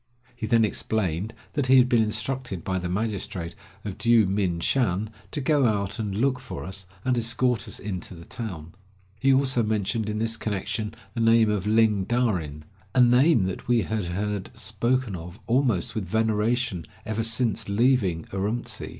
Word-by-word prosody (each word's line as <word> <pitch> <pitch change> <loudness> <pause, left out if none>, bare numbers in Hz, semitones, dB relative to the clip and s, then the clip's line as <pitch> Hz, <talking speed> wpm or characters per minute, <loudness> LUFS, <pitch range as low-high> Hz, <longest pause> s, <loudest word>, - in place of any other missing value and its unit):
He 115 -3 -4
then 115 0 +4
explained 105 -2 -1 0.2
that 145 -3 0
he 130 +1 +7
had 125 -1 +6
been 120 -3 +4
instructed 110 -2 -2
by 95 -1 -1
the 90 -1 -4
magistrate 95 -4 -3 0.3
of 100 -3 -5
Dyou 115 -2 +5
min 95 -3 0
shan 110 -1 +1 0.2
to - - -3
go 140 -1 +3
out 100 -2 -1
and 105 -3 -2
look 130 +4 +1
for 130 - -7
us, 95 0 -5 0.2
and 130 -1 +2
escort 120 +1 0
us - - -4
into 95 -2 -6
the 85 0 -12
town. 85 -9 -7 0.5
He 135 +3 +4
also 130 -2 +3
mentioned 110 0 0
in 105 - -2
this 115 +1 -1
connection 105 0 -3 0.2
the 115 - -2
name 115 -1 +5
of 105 -2 -1
Ling 110 -3 +3
Darin 90 -12 -1
— 95 +5 -31
a 130 - +6
name 125 - +5
that 95 +6 -4
we 120 -3 +3
had 110 -3 -2
heard 100 +2 -3
spoken 110 +1 0
of 85 +2 -8
almost 120 -6 +1
with 105 -4 -3
veneration 110 - 0 0.2
ever 110 0 -1
since 115 -2 0
leaving 100 -6 +2
Urumtsi. 105 +5 -3
110 Hz, 175 wpm, -25 LUFS, 95-120 Hz, 0.5 s, he